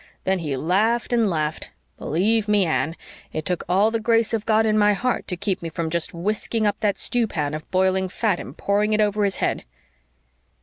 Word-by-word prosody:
Then 190 0 +1
he 150 -5 -3
laughed 215 - +1
and 230 -3 +3
laughed. 155 -2 -2 0.3
Believe 210 +7 +1
ME, 210 -2 +3
Anne, 160 0 0 0.4
it 155 - -4
took 180 -2 -1
all 200 +5 +3
the 230 - -1
grace 230 0 +2
of 220 -2 -2
God 220 0 +3
in 215 -1 +2
my 210 -1 +4
heart 250 +5 -1
to 180 - -3
keep 195 0 -2
me 165 - -4
from 160 0 -3
just 170 -1 0
whisking 210 +5 -1
up 205 - 0
that 205 -2 0
stew 240 -2 0
pan 150 -7 -2
of 155 0 -6
boiling 190 0 +1
fat 200 -1 0
and - - -9
pouring 210 +2 +1
it 215 - +2
over 210 0 +2
his 195 -1 +1
head." - - -1
200 Hz, 210 wpm, -23 LUFS, 175-215 Hz, 0.4 s, my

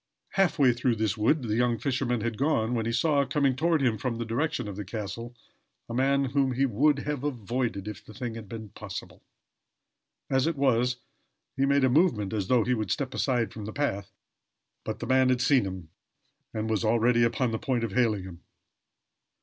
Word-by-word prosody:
Half 195 -5 +1
way 130 -4 +5
through 120 0 0
this 110 -3 0
wood 125 +7 +2
the 110 -2 -1
young 120 0 +2
fisherman 125 -3 -1
had 115 0 -2
gone, 125 -3 +1
when 115 -2 -1
he - - 0
saw, 145 +3 +2
coming 140 -2 +1
toward 160 +1 +1
him 115 -5 +1
from 125 +1 -2
the 115 - -3
direction 125 +2 -1
of 100 - -6
the 105 - -5
castle, 110 +3 -6 0.5
a 115 - -6
man 135 +2 +2
whom 135 -2 +2
he 135 +3 +2
would 140 +5 +3
he 140 - -5
have 145 -2 -3
avoided 120 -5 -2
if 105 -4 -7
the - - -13
thing 120 -3 -4
had 110 -3 -9
been 110 -1 -7
possible. - - -8 1.1
As 130 +2 +2
it 165 - 0
was, 125 -3 +2 0.6
he 135 +1 +1
made 140 0 +3
a - - +5
movement 125 - +2
as 100 -4 -1
though 125 -1 +4
he 125 - +1
would 110 -5 -2
step 130 -2 -2
aside 125 -5 0
from 105 -2 -7
the 110 - -5
path, 100 -10 -2 0.7
but - - -4
the - - -3
man 130 0 +3
had 125 -1 +2
seen 125 -2 +3
him, 95 -4 -6 0.6
and 110 0 -3
was 110 -4 0
already 115 +2 +3
upon 120 +1 +1
the 110 - -2
point 125 -4 -1
of 115 - -2
hailing 110 -3 +1
him. 90 -2 -10
120 Hz, 205 wpm, -27 LUFS, 110-135 Hz, 1.1 s, way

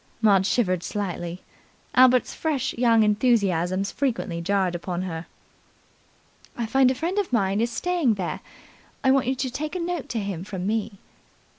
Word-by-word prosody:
Maud 200 -4 +4
shivered 185 -8 +1
slightly. 180 -3 -4 0.5
Albert's 255 -1 +5
fresh 275 -5 -1
young 230 -2 +4
enthusiasms 200 -4 +1
frequently 230 -11 -2
jarred 190 0 +1
upon 175 +1 -3
her. 165 -2 -5 1.3
"I 235 - -1
find 265 +3 +4
a 260 - 0
friend 345 +9 -1
of 400 - -2
mine 200 -3 +1
is 235 - +1
staying 320 -2 +1
there. 185 -3 -3 0.6
I 265 - +4
want 270 -2 +2
you 265 - +1
to 260 0 -2
take 305 +6 -4
a - - -1
note 345 -3 -3
to 230 - -2
him 195 -4 -4
from 190 -2 -5
me." 215 0 -1
220 Hz, 160 wpm, -24 LUFS, 190-260 Hz, 1.3 s, Albert's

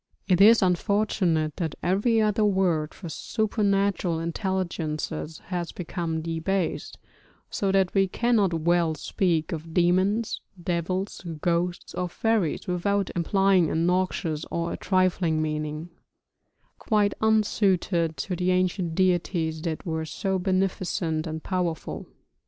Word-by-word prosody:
It 185 -1 +3
is 220 +1 +7
unfortunate 180 -4 +1
that 160 -4 -2
every 205 +7 +2
other 215 0 +2
word 185 -7 +1
for 180 - -9
supernatural 200 -3 0
intelligences 165 -3 -3
has 175 -2 -3
become 165 -2 -4
debased, 165 +3 -2 0.5
so 195 -1 0
that 190 -1 +2
we 195 -1 +3
cannot 220 -2 +2
well 170 -1 +2
speak 165 +1 0
of 160 0 -6
demons, 185 +6 +2 0.2
devils, 180 +3 -2 0.2
ghosts, 175 +1 -1
or 180 -1 -2
fairies 215 -4 0
without 195 +2 0
implying 185 0 +3
a - - -2
noxious 170 -2 0
or 170 0 -2
a - - -4
trifling 185 -4 +1
meaning, 155 +1 -3 0.9
quite 210 -3 +2
unsuited 195 -6 +2
to 185 - -3
the 180 +1 0
ancient 185 -2 0
deities 175 -3 +1
that 160 -1 -4
were 160 -2 -2
so 190 +4 -2
beneficent 180 -4 -1
and 160 0 -5
powerful. 180 -4 -3
180 Hz, 120 wpm, -26 LUFS, 165-195 Hz, 0.9 s, is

